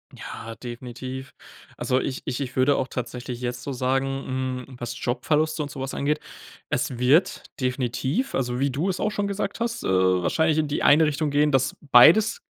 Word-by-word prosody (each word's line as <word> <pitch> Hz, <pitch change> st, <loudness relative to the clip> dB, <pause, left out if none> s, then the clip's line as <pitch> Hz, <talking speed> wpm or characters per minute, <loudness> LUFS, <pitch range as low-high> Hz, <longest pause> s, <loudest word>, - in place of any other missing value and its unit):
Ja, 115 Hz, 0 st, -8 dB
definitiv. 125 Hz, +2 st, -7 dB, 0.5 s
Also, 130 Hz, -, +1 dB
ich 130 Hz, 0 st, -3 dB
ich 125 Hz, -, -3 dB
ich 130 Hz, -2 st, -4 dB
würde 130 Hz, +2 st, +4 dB
auch 130 Hz, -, -1 dB
tatsächlich 125 Hz, 0 st, -5 dB
jetzt 125 Hz, 0 st, -4 dB
so 140 Hz, -, -4 dB
sagen, 130 Hz, +1 st, 0 dB, 0.6 s
hm, 135 Hz, -, -12 dB
was 120 Hz, 0 st, -6 dB
Jobverluste 155 Hz, +5 st, 0 dB
und 145 Hz, -, -7 dB
so -, -, -8 dB
was 135 Hz, 0 st, -4 dB
angeht, 150 Hz, +2 st, 0 dB, 0.5 s
es 125 Hz, -, -1 dB
wird 135 Hz, +8 st, +3 dB, 0.2 s
definitiv, 130 Hz, -, -1 dB
also, 125 Hz, -1 st, -1 dB
wie 140 Hz, +1 st, +2 dB
du 145 Hz, +9 st, -1 dB
es 185 Hz, -, -2 dB
auch 215 Hz, -, +1 dB
schon 205 Hz, -1 st, -2 dB
gesagt 200 Hz, +1 st, -3 dB
hast, 235 Hz, 0 st, -2 dB
äh, -, -, -2 dB
wahrscheinlich 95 Hz, -, +2 dB
in 155 Hz, -, +1 dB
die 145 Hz, -, -2 dB
eine 155 Hz, +2 st, +6 dB
Richtung 150 Hz, 0 st, -1 dB
gehen, 145 Hz, +1 st, +3 dB
dass 135 Hz, -2 st, +1 dB
beides 160 Hz, -, +6 dB
135 Hz, 185 wpm, -24 LUFS, 125-155 Hz, 0.6 s, eine